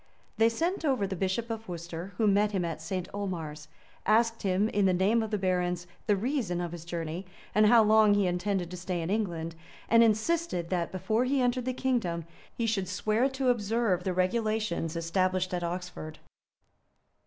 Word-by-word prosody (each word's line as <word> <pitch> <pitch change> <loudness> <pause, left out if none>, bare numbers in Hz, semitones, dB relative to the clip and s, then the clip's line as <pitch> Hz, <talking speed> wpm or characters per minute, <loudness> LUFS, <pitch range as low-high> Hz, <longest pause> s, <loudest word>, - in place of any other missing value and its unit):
[] - - -36
They 225 +1 +6
sent 335 +10 -1
over 265 -9 +1
the 190 0 -3
bishop 195 +6 -1
of 225 -2 -6
Worcester, 170 +2 -6
who 220 - +2
met 205 +1 +3
him 185 -3 0
at 165 -1 -4
St. 180 +2 -3
Omars; 165 -7 -4 0.4
asked 230 +1 +2
him, 195 +1 +2
in 205 -2 +1
the 185 -1 +3
name 205 +6 +3
of 220 - -3
the 210 - 0
barons, 180 -2 0 0.2
the 205 - +4
reason 220 -5 -1
of 175 -1 -3
his 170 -1 -8
journey, 170 +1 -4 0.3
and 215 0 +5
how 230 0 +7
long 215 -1 +5
he 205 -1 +2
intended 180 0 -1
to 180 - -6
stay 175 -1 -3
in 165 - -3
England; 170 -6 -2 0.3
and 230 +1 +6
insisted 220 - +1
that, 175 -2 0
before 215 +6 0
he 275 +2 +1
entered 250 0 +1
the 255 - 0
kingdom 230 -11 -1 0.3
he 235 - 0
should 205 -4 0
swear 215 +7 +1
to 265 -1 0
observe 220 -5 +1
the 185 - 0
regulations 185 -3 0
established 185 +2 0
at 175 -1 -1
Oxford. 170 -3 -5
195 Hz, 190 wpm, -29 LUFS, 175-225 Hz, 0.4 s, how